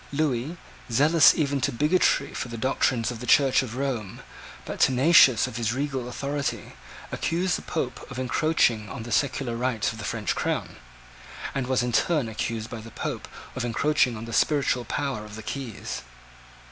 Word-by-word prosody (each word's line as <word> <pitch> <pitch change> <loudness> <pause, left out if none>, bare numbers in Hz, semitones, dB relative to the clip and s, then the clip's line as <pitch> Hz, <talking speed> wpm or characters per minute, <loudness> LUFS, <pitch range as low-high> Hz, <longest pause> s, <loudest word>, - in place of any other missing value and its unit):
Lewis, 145 +1 -1 0.3
zealous 150 +6 +6
even 140 -3 0
to - - +1
bigotry 150 +9 +2
for - - -4
the 115 -1 -7
doctrines 125 -1 +1
of 120 - -7
the 125 - -7
Church 135 -2 +5
of 120 -3 -6
Rome, 125 -7 -3 0.4
but - - -6
tenacious 130 -1 +6
of 110 - -6
his 115 -1 0
regal 135 -3 -2
authority, 140 +3 -3 0.4
accused 180 +2 0
the - - -5
Pope 130 -6 -4
of 135 - -8
encroaching 125 -5 +1
on 125 - -6
the 120 - -8
secular 135 -3 0
rights 120 -3 0
of 110 - -10
the - - -6
French 105 -1 -1
Crown, - - -2 0.8
and 135 -2 -2
was 130 -1 +1
in 125 - -1
turn 150 +1 +2
accused 110 0 -3
by 115 -2 -7
the 115 - -10
Pope - - -5 0.3
of 130 - -2
encroaching 125 0 +1
on 110 - -7
the 115 - -7
spiritual 135 -5 +2
power 135 -7 -2
of 105 -1 -10
the 110 - -8
keys. 130 -3 -5
130 Hz, 175 wpm, -26 LUFS, 115-140 Hz, 0.8 s, zealous